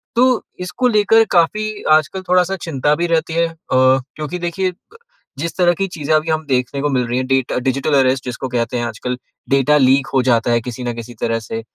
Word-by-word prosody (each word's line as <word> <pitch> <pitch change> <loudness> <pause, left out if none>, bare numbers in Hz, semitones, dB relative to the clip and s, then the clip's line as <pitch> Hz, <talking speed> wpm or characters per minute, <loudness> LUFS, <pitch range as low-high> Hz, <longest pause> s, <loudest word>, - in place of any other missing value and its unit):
तो 250 0 +3 0.2
इसको 215 +8 -1
लेकर 225 0 +4
काफ़ी 210 +5 +2 0.3
आजकल 155 +5 -3
अ - - -11
थोड़ा-सा 180 +1 +3
चिंता 150 -2 0
भी 170 +2 -1
रहती 165 -1 0
है, 170 0 +1 0.2
क्योंकि 130 +6 +1
देखिए, 180 +2 -2 0.7
जिस 170 +2 -3
तरह 175 -1 +4
की 195 +3 -2
चीज़ें 155 -3 -3
अभी 155 +1 0
हम 155 0 -1
देखने 130 +1 -1
को 145 - 0
मिल 125 -3 0
रही 120 +1 -1
हैं 130 0 -2
डेटा 135 -1 0
डिजिटल 135 +3 -1
अरेस्ट, 130 0 +2
जिसको 125 +1 -4
कहते 120 0 -1
हैं 120 - -1
आजकल 125 +2 -4 0.3
डाटा 140 +2 +3
लीक 135 0 +3
हो 130 - +3
जाता 120 -1 +2
है 115 - +2
किसी 125 +1 -7
न 120 -1 -2
किसी 120 +1 -8
तरह 115 0 0
से। 115 +1 -6
140 Hz, 210 wpm, -18 LUFS, 125-175 Hz, 0.7 s, लेकर